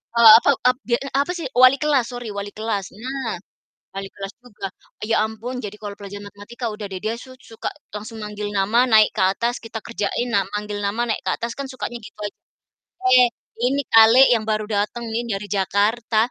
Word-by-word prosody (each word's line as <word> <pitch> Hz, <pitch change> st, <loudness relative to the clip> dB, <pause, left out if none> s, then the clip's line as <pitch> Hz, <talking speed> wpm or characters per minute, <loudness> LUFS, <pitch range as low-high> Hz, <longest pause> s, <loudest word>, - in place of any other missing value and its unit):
Eee, 230 Hz, -2 st, +9 dB
ape -, -, +1 dB, 0.2 s
ap 250 Hz, -, +1 dB
dia 235 Hz, -1 st, +2 dB
eee, 275 Hz, -, -7 dB
apa 285 Hz, -, -2 dB
sih, 335 Hz, -4 st, -4 dB
wali 255 Hz, +1 st, +8 dB
kelas, 290 Hz, -5 st, +2 dB
sorry 245 Hz, -2 st, -6 dB
wali 200 Hz, 0 st, -5 dB
kelas. 215 Hz, -3 st, -2 dB
Nah, 255 Hz, +2 st, -4 dB, 0.6 s
wali 195 Hz, 0 st, -4 dB
kelas 195 Hz, +1 st, -7 dB
juga. 215 Hz, -5 st, -7 dB, 0.4 s
Ya 225 Hz, -, +3 dB
ampun 220 Hz, +3 st, -6 dB
jadi 205 Hz, -1 st, -5 dB
kalau 205 Hz, -1 st, -7 dB
pelajaran 205 Hz, 0 st, -9 dB
matematika 205 Hz, +4 st, -9 dB
udah 210 Hz, -1 st, -6 dB
deh 190 Hz, -, -4 dB
dia 220 Hz, +2 st, -2 dB
su 260 Hz, +2 st, -12 dB
suka 225 Hz, -, -6 dB, 0.3 s
langsung 215 Hz, +2 st, -7 dB
manggil 210 Hz, 0 st, -5 dB
nama, 210 Hz, +5 st, +3 dB
naik 220 Hz, -3 st, +5 dB
ke -, -, +3 dB
atas, 235 Hz, +4 st, -1 dB
kita 225 Hz, 0 st, -6 dB
kerjain. 230 Hz, +2 st, -2 dB
Nah, 200 Hz, -5 st, +2 dB
manggil 210 Hz, 0 st, -3 dB
nama 205 Hz, +4 st, -1 dB
naik 220 Hz, -, -1 dB
ke -, -, +1 dB
atas 235 Hz, 0 st, -5 dB
kan 280 Hz, -, -4 dB
sukanya 250 Hz, -2 st, -5 dB
gitu -, -, -14 dB
aj 205 Hz, -1 st, -4 dB, 0.9 s
eh, 250 Hz, -, +7 dB, 0.4 s
ini 275 Hz, +2 st, +1 dB
kali 225 Hz, +2 st, +8 dB
yang 225 Hz, -2 st, +1 dB
baru 215 Hz, 0 st, 0 dB
dateng 210 Hz, +3 st, -1 dB
nih 230 Hz, -, 0 dB
dari 200 Hz, +1 st, -6 dB
Jakarta 215 Hz, +4 st, +1 dB
220 Hz, 200 wpm, -22 LUFS, 205-240 Hz, 0.9 s, Eee